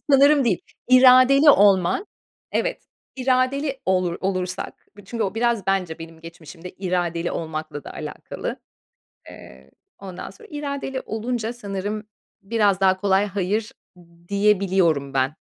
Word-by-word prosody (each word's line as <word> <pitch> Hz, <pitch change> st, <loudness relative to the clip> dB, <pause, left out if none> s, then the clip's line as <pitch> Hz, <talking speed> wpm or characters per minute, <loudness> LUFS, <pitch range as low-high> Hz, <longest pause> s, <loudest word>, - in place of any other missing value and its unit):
Sanırım 280 Hz, +1 st, +5 dB
değil. 205 Hz, -7 st, +1 dB, 0.3 s
İradeli 255 Hz, +3 st, +7 dB
olman. 200 Hz, -, +4 dB, 0.5 s
Evet, -, -, -1 dB, 0.3 s
iradeli 265 Hz, +2 st, 0 dB
olur 185 Hz, -2 st, +1 dB
olursak 185 Hz, -1 st, -4 dB
bir 205 Hz, -, -14 dB
çünkü 230 Hz, +3 st, -3 dB
o 190 Hz, +2 st, -3 dB
biraz 230 Hz, -3 st, 0 dB
bence 185 Hz, -4 st, -1 dB
benim 165 Hz, 0 st, -11 dB
geçmişimde 165 Hz, +1 st, -11 dB
iradeli 175 Hz, -2 st, -2 dB
olmakla 155 Hz, -2 st, -5 dB
da -, -, -8 dB
alakalı. -, -, -6 dB, 0.7 s
Eee, 65 Hz, +2 st, -14 dB, 0.3 s
ondan 190 Hz, -2 st, -8 dB
sonra 195 Hz, -, -16 dB
iradeli 280 Hz, -2 st, -4 dB
olunca 225 Hz, +1 st, -3 dB
sanırım 205 Hz, -2 st, -5 dB, 0.4 s
biraz 205 Hz, -2 st, +1 dB
daha 190 Hz, -1 st, +4 dB
kolay 195 Hz, +1 st, +2 dB
hayır 205 Hz, +2 st, -2 dB, 0.6 s
diyebiliyorum 190 Hz, -8 st, +2 dB
ben. 135 Hz, +2 st, +1 dB
195 Hz, 120 wpm, -22 LUFS, 180-245 Hz, 0.7 s, İradeli